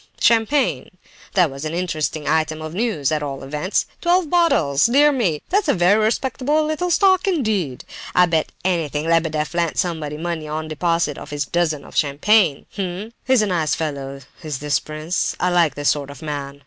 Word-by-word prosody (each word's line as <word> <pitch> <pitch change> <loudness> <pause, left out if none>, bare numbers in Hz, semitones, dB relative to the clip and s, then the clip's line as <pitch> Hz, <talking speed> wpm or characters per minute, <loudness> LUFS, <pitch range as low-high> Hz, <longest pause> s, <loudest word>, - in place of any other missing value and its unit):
champagne! 225 - +2 0.5
That 180 -6 +4
was 135 +2 -8
an 155 +1 -3
interesting 155 -4 -2
item 155 0 +1
of 155 0 -7
news, 190 - -1
at 155 -1 0
all 140 -2 -5
events!—Twelve 215 - -1
bottles! 170 - +3
Dear 285 +5 +5
me, 195 - -1
that's 400 -1 +1
a - - +3
very 190 +5 +3
respectable 265 +6 0
little 310 +4 -1
stock 375 +2 +3
indeed! 215 - -1 0.3
I 180 - +6
bet 165 -3 0
anything 160 -5 -1
Lebedeff 160 -2 0
lent 170 -2 -1
somebody 160 -5 -2
money 165 -1 -4
on 155 +1 -4
deposit 165 -1 -1
of - - -10
this 145 -1 -2
dozen 160 -2 -1
of - - -14
champagne. 155 +3 +2
Hum! 195 +4 -4
he's 255 -4 +4
a - - +2
nice 170 -6 0
fellow, 140 -3 -4 0.2
is 150 -4 -4
this 150 +2 0
prince! 155 +3 -3
I 180 - +1
like 170 -3 +3
this 145 0 +1
sort 145 -2 -1
of 140 +3 -11
man. 140 -2 -5
165 Hz, 175 wpm, -21 LUFS, 150-215 Hz, 0.5 s, I